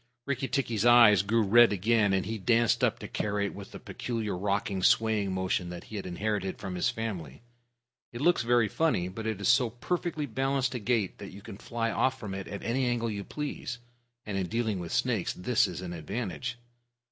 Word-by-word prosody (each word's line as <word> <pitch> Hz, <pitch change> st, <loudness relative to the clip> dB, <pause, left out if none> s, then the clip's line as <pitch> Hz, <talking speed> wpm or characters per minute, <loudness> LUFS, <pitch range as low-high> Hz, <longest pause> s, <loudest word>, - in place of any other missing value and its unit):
Rikki 135 Hz, -1 st, -2 dB
tikki's 120 Hz, -7 st, -1 dB
eyes 120 Hz, -5 st, +7 dB
grew 110 Hz, +3 st, +2 dB
red 115 Hz, +3 st, +6 dB
again, 105 Hz, +1 st, +2 dB
and 95 Hz, 0 st, +1 dB
he 110 Hz, 0 st, -4 dB
danced 115 Hz, +2 st, +2 dB
up -, -, +2 dB
to -, -, -8 dB
Karait 100 Hz, -1 st, -2 dB
with 100 Hz, -1 st, -9 dB
the -, -, -9 dB
peculiar 115 Hz, -5 st, -4 dB
rocking, 100 Hz, 0 st, -1 dB
swaying 105 Hz, -1 st, +3 dB
motion 95 Hz, -1 st, -1 dB
that 90 Hz, 0 st, -7 dB
he 110 Hz, -, -10 dB
had 100 Hz, -2 st, -4 dB
inherited 95 Hz, +1 st, -2 dB
from 95 Hz, -, -6 dB
his 90 Hz, -, +1 dB
family. 95 Hz, -, -5 dB, 0.7 s
It 120 Hz, -, -7 dB
looks 175 Hz, +2 st, +3 dB
very 120 Hz, -1 st, +3 dB
funny, 105 Hz, -, 0 dB
but 110 Hz, +4 st, -6 dB
it 110 Hz, -3 st, -2 dB
is 100 Hz, -, -1 dB
so 125 Hz, -4 st, +4 dB
perfectly 155 Hz, +5 st, -2 dB
balanced 135 Hz, +1 st, 0 dB
a 125 Hz, -, -3 dB
gait 110 Hz, -3 st, 0 dB
that 100 Hz, -, -8 dB
you 100 Hz, +1 st, -11 dB
can 100 Hz, -, -9 dB
fly 115 Hz, -1 st, -2 dB
off 130 Hz, +2 st, +1 dB
from 105 Hz, -4 st, -6 dB
it 95 Hz, -1 st, -5 dB
at 100 Hz, -, -6 dB
any 125 Hz, +2 st, 0 dB
angle 115 Hz, -2 st, 0 dB
you 100 Hz, -1 st, -4 dB
please, 140 Hz, -1 st, -5 dB, 0.5 s
and 100 Hz, -2 st, -2 dB
in 95 Hz, -, -2 dB
dealing 110 Hz, -2 st, -1 dB
with 85 Hz, -2 st, -6 dB
snakes 120 Hz, -6 st, 0 dB
this 120 Hz, +6 st, +2 dB
is -, -, -6 dB
an 90 Hz, -1 st, -5 dB
advantage. 110 Hz, +8 st, -4 dB
110 Hz, 205 wpm, -29 LUFS, 95-120 Hz, 0.7 s, eyes